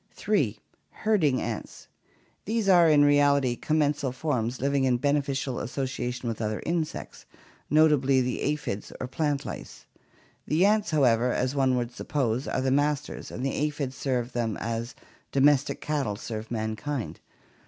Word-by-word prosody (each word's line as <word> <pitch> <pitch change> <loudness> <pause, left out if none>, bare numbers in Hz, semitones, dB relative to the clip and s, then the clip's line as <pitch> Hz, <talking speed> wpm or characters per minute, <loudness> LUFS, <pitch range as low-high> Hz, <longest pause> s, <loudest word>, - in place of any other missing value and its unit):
Herding 170 -12 +3
attfs. - - -5 0.6
These 220 0 -1
are 175 -4 +6
in 145 -1 +6
reality 140 -3 +3
commensal 145 -2 0
forms 125 -3 -2
living 140 0 +1
in 125 -2 +3
ben 145 +4 +2
eficial 135 -2 -3
association 125 -1 -3
with 115 -1 -3
other 105 -1 -2
insects, 165 -2 -3 0.4
notably 145 -4 +4
the 125 -1 -1
aphids 145 -9 -2
or - - -3
plant 145 +1 -1
lice. - - -8 0.6
The 160 +5 +3
ants, 210 -1 +2
however, 125 -6 +3
as 125 +2 0
one 135 -2 +2
would 120 -1 -2
suppose, 130 -1 -2
are - - -1
the 130 0 +1
masters 145 +1 -1
and 130 - -5
the 135 - -1
aphids 145 -3 -2
serve 125 -2 -2
them 115 -4 -1
as 115 +2 -4 0.4
domestic 140 0 +3
cattle 140 -9 -1
serve 110 +1 -6
mankind. 110 +3 -3
135 Hz, 145 wpm, -27 LUFS, 125-150 Hz, 0.6 s, are